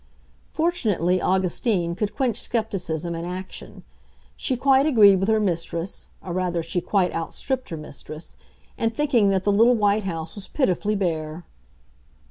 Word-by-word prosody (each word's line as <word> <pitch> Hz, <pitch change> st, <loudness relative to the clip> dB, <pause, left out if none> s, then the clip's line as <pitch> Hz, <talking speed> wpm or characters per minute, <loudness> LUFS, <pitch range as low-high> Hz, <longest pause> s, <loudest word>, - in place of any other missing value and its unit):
Fortunately, 210 Hz, -, +1 dB
Augustine 185 Hz, -1 st, +1 dB
could 210 Hz, +3 st, -3 dB
quench 245 Hz, -3 st, 0 dB
skepticism 175 Hz, -7 st, -2 dB
in 165 Hz, 0 st, -4 dB
action. 185 Hz, +2 st, -7 dB, 0.5 s
She 260 Hz, -, -1 dB
quite 270 Hz, +2 st, +4 dB
agreed 210 Hz, -9 st, +7 dB
with 195 Hz, +3 st, 0 dB
her 220 Hz, 0 st, +4 dB
mistress—or 175 Hz, -1 st, -3 dB
rather 175 Hz, -2 st, -1 dB
she 170 Hz, +2 st, -2 dB
quite 180 Hz, 0 st, +1 dB
out 165 Hz, 0 st, -4 dB
stripped 260 Hz, -1 st, -2 dB
her 165 Hz, -, -4 dB
mistress—in 155 Hz, +8 st, -7 dB
thinking 235 Hz, -4 st, +2 dB
that 190 Hz, -1 st, +1 dB
the 205 Hz, -, +2 dB
little 230 Hz, +4 st, +5 dB
white 205 Hz, -1 st, +2 dB
house 165 Hz, -3 st, -4 dB
was 200 Hz, -2 st, -7 dB
pitifully 210 Hz, -, 0 dB
bare. 165 Hz, -3 st, -2 dB
195 Hz, 140 wpm, -24 LUFS, 170-225 Hz, 0.5 s, agreed